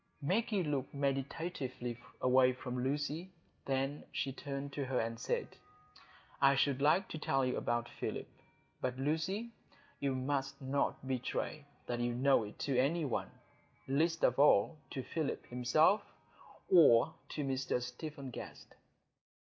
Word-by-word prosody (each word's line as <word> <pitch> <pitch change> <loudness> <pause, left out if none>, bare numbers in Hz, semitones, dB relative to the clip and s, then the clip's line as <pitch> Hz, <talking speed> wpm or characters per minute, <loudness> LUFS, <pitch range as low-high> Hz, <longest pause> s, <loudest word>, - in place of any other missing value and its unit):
Maggie 195 +6 +1
looked 145 -3 -2
meditatively 135 -3 -2 0.2
away 130 0 +5
from 125 -1 -4
Lucy. 145 +6 -2 0.4
Then 135 +2 -1
she 135 - -2
turned 140 0 -5
to 140 -1 -2
her 130 -1 0
and 115 0 -2
said, - - -1 0.9
"I 140 0 +6
should 140 -1 +2
like 165 +7 +4
to 160 - -5
tell 135 -3 +1
you 125 - 0
about 120 0 -1
Philip. - - -4 0.5
But, 125 0 -1
Lucy, 160 - -1 0.5
you 140 -2 0
must 135 +1 -1
not 135 -1 -1
betray 135 +3 -2 0.2
that 120 -1 -2
you 120 0 0
know 135 0 +4
it 105 - -10
to 135 -3 +2
any 155 +5 +2
one—least 150 +4 -3
of - - +3
all 145 +1 +5
to 130 - -4
Philip 155 0 -3
himself, 155 - +3 0.7
or 150 -11 +6 0.2
to 150 - -3
Mr 135 -2 0
Stephen 135 +2 -6
Guest." - - -9
135 Hz, 135 wpm, -35 LUFS, 130-150 Hz, 0.9 s, I